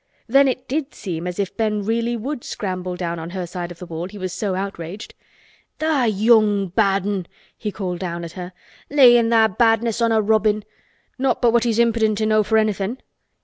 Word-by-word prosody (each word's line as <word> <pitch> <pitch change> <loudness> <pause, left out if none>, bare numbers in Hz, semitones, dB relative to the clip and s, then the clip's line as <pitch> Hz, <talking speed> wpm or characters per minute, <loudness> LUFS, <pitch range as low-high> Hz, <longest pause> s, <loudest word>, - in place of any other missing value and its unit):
Then 275 +3 +4
it 255 0 -2
did 295 +1 -3
seem 175 -3 -5
as 180 - -5
if 200 -2 -3
Ben 215 -2 0
really 230 +3 -1
would 250 +3 -5
scramble 185 -2 -4
down 170 -1 -3
on 165 +1 -6
her 185 0 -4
side 175 0 -5
of 175 - -10
the 180 - -9
wall, 170 0 -5
he 205 +2 -11
was 185 -2 -4
so 200 -4 -2
outraged. 195 0 -6 0.6
"Tha' 310 -6 +1
young 210 -2 +3
bad 195 0 +1
'un!" 195 -4 -2 0.3
he 210 - -4
called 180 -4 -4
down 170 -2 -4
at 165 - -8
her. 180 0 -7 0.4
"Layin' 240 -5 +6
tha' 220 -4 +3
badness 230 0 +2
on 230 0 +3
a 220 - +3
robin—not 215 +4 -1
but 235 -2 +3
what 235 0 +3
he's 230 -2 +1
impidint 225 -2 +2
enow 215 0 +3
for 220 +2 +1
anythin'. 215 +1 0
210 Hz, 190 wpm, -21 LUFS, 185-230 Hz, 0.6 s, Layin